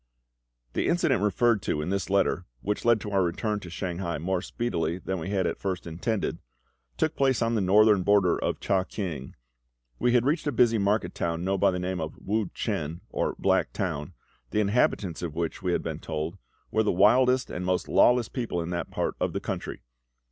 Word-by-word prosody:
The - - 0
incident 170 - +2
referred 105 +2 +2
to 75 - -1
in 75 +5 -2
this 100 0 -1
letter, 95 -2 +1
which 105 +1 -2
led 115 -2 +5
to 105 - -5
our 100 -1 +3
return 100 +4 -1
to 90 - -9
Shanghai 85 0 -3
more 90 +4 -1
speedily 85 -9 -2
than 95 0 -4
we 85 - -5
had 95 -2 0
at - - -2
first 95 -3 -3
intended, 90 +7 -2 0.6
took - - 0
place 135 -3 +2
on 115 0 +1
the 110 - +1
northern 105 +1 +5
border 95 -2 +4
of - - -1
CHEH 95 -1 +1
KIANG. 80 -10 -5 0.6
We 125 0 +2
had 120 -1 +4
reached 150 +2 +1
a - - +2
busy 115 -2 +3
market 100 +2 +1
town 85 0 -2
known 95 +1 0
by - - +5
the 90 - -1
name 90 -1 -2
of 80 0 -5
Wu 105 -2 -1
chen, 80 +3 -3
or - - -1
Black - - +1
Town, 75 +4 -3 0.3
the 105 - 0
inhabitants 100 -4 +1
of 85 -4 -4
which, 85 -1 -3
we - - 0
had - - 0
been - - -4
told, 80 +5 -4 0.3
were 110 - +2
the 110 - +2
wildest 125 +7 +4
and 90 - -4
most 90 0 0
lawless 125 -2 +4
people 120 -9 -3
in 85 +1 -3
that 85 - -3
part - - -1
of - - -1
the - - -1
country. - - -5
95 Hz, 205 wpm, -27 LUFS, 85-110 Hz, 0.6 s, led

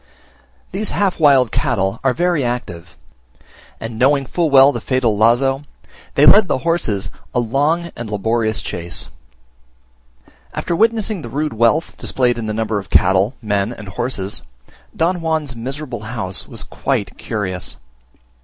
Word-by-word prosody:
These 210 +3 0
half 195 -4 0
wild 135 -6 +5
cattle 110 - 0
are 130 -2 +2
very 175 -4 +1
active; 90 -9 -4 0.8
and 115 0 -6
knowing 135 +2 +3
full 170 +3 0
well 135 0 +7
the 120 -4 -5
fatal 125 -3 +1
lazo, 120 +5 +3 0.5
they 145 - +5
led 205 +3 +7
the - - +1
horses 105 - 0 0.2
a - - +3
long 145 +8 0
and 115 -2 -6
laborious 110 +2 0
chase. 85 0 -4 1.5
After 170 - -1
witnessing 220 -2 +1
the 120 - -7
rude 150 +2 -2
wealth 115 +9 +1
displayed 120 -2 0
in 110 - -4
the - - -1
number 110 -1 -1
of 95 -1 -10
cattle, 95 +6 +3
men, 100 0 0
and 105 -4 -9
horses, 100 -2 -3 0.5
Don 175 +3 +1
Juan's 160 -5 -2
miserable 130 0 -5
house 110 -4 -3
was - - -8
quite 100 -2 -2
curious. 95 -5 -3
120 Hz, 145 wpm, -19 LUFS, 110-150 Hz, 1.5 s, well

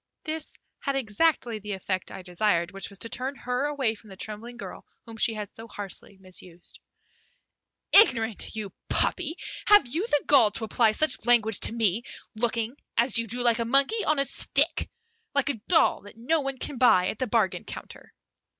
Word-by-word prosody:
This 315 -1 -5 0.2
had 275 -2 -2
exactly 240 -1 0
the 210 0 -6
effect 185 -1 -3
I 190 - -9
desired, 180 -1 0
which 195 0 -4
was 200 - -6
to 230 - -4
turn 260 +4 -3
her 250 +1 -2
away 280 -6 0
from 220 -1 -16
the 190 - -11
trembling 225 +4 -6
girl - - -9 0.2
whom 230 - -10
she 225 0 +2
had 210 -2 -7
so 225 +1 -10
harshly 200 -1 -8
misused. 185 -2 -11 1.1
"Ignorant, 230 - +4
you 205 -3 -6 0.2
puppy! 330 -3 +2 0.3
Have 415 -5 +7
you 320 - -2
the 295 -10 +1
gall 260 -7 +6
to 225 - -4
apply 220 0 +2
such 310 -2 +2
language 225 -4 +5
to - - +2
me, 225 -2 0 0.3
looking, 230 +1 0 0.2
as 235 +1 +3
you 230 - -3
do, 245 +3 0
like 235 -1 +3
a - - +1
monkey 275 - +2
on 305 - +2
a 275 - +1
stick; - - 0 0.5
like 280 +1 +2
a 235 -7 -3
doll 345 - +4
that 205 - -14
one 275 +2 -1
can 255 0 -4
buy 185 -8 +5
at - - -6
the 255 - -1
bargain 215 -4 0
counter." - - -9
230 Hz, 185 wpm, -26 LUFS, 210-275 Hz, 1.1 s, Have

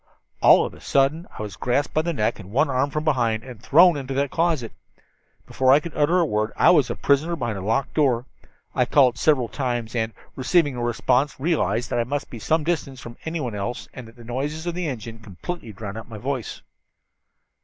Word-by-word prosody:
"All - - +7
of - - -6
a - - -15
sudden 140 +5 +1
I - - -4
was 105 -4 -7
grasped 125 +4 -1
by 155 - +2
the 170 +2 -2
neck 110 -9 -1
and 95 -3 -10
one 140 +7 +1
arm 130 +2 +1
from 150 +2 -3
behind, 120 -8 +1
and 125 -5 -11
thrown 170 +3 +6
into 135 -2 -4
that 140 0 0
closet. 160 -9 0 0.7
Before 130 0 +2
I 140 - +7
could 165 +2 -9
utter 155 +4 +3
a 170 - +3
word 110 -4 -1
I - - +6
was 145 -7 +4
a - - -2
prisoner 150 +5 +1
behind 120 -9 -3
a - - -6
locked 115 +8 -1
door. 130 -5 +2 0.5
I 125 - +2
called 125 -2 +3
several 135 -6 +3
times, 120 -5 -3
and, 110 -1 0 0.2
receiving 145 +2 +2
no 120 - -5
response, 125 +4 +1
realized 140 -6 0
that 120 - +1
I - - +2
must 140 +4 -4
be 115 - -7
some 155 +8 +1
distance 145 -5 -2
from 120 -1 -10
anyone 160 -8 -3
else 105 +4 -4
and 125 -3 -9
that 115 - -16
the 120 - -14
noises 140 +7 -4
of 175 - -2
the 175 -1 -3
engines 115 -4 -6
completely 110 - -7
drowned 105 +1 -7
out 110 - -11
my 110 - -8
voice. 130 +1 -4
130 Hz, 220 wpm, -23 LUFS, 115-150 Hz, 0.7 s, All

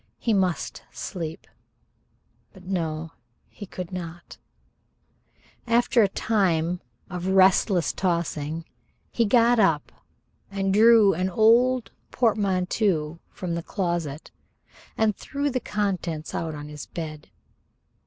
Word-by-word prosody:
He 230 - 0
must 185 -4 0
sleep: 165 -4 -6 1.1
but 190 -2 -15
no, 165 -4 -3 0.4
he 205 - -10
could 180 -1 -7
not. 175 -2 -8 1.3
After 235 +1 +3
a 205 - +5
time 180 -5 0 0.3
of 180 -1 -5
restless 190 -2 +4
tossing 165 -3 -2 0.5
he 235 - +2
got 235 +2 +4
up 165 -8 +2 0.6
and 195 -1 -1
drew 220 -1 +6
an 185 +3 -1
old 235 +5 +3 0.2
portmanteau 190 -7 0
from 180 -2 -5
the 170 - -2
closet 170 -5 -3 0.7
and 220 -2 +2
threw 285 +5 -3
the 255 - 0
contents 185 -8 -3
out 160 -2 -3
on 145 0 -7
the 150 0 -8
bed. 155 - -6
185 Hz, 110 wpm, -25 LUFS, 165-215 Hz, 1.3 s, drew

